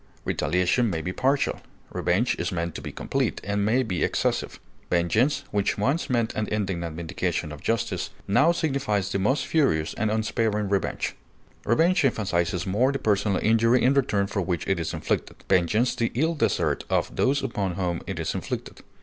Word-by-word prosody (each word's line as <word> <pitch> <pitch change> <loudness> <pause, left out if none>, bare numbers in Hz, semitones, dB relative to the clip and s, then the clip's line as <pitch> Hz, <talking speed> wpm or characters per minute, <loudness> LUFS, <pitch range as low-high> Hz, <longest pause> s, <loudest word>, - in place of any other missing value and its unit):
Retaliation 90 +7 +1
may 80 -4 -2
be 90 - -3
partial; 135 +6 +1 0.3
revenge 95 +8 +1
is - - -1
meant 85 -2 -2
to - - -6
be - - -6
complete, - - -1
and 100 0 -1
may 120 +5 +2
be 90 -7 -1
excessive. - - -1 0.3
Vengeance, 100 - +2
which 100 -1 0
once 140 +11 0
meant 120 -3 +1
an 110 - -2
indignant 95 -6 -2
vindication 85 -1 -2
of 75 -1 -9
justice, 115 -1 -1 0.2
now 145 +12 +4
signifies 135 - -1
the 100 - 0
most 130 +9 +1
furious 105 - +1
and 110 0 -1
unsparing 110 -1 0
revenge. 100 -1 -1 0.5
Revenge 165 - +3
emphasizes 95 -7 0
more 110 +8 +2
the 135 - -1
personal 100 -4 +1
injury 115 +2 +4
in 130 +2 +5
return 120 -8 +2
for 100 0 -2
which 90 -3 -2
it 95 -3 +1
is 80 - -2
inflicted, - - -2
vengeance 100 +7 +2
the 115 - -1
ill 160 +6 +2
desert 150 - 0
of - - 0
those 140 +1 +2
upon 100 -8 -2
whom 85 -2 -2
it - - -4
is - - -2
inflicted. - - -5
105 Hz, 175 wpm, -25 LUFS, 90-125 Hz, 0.5 s, in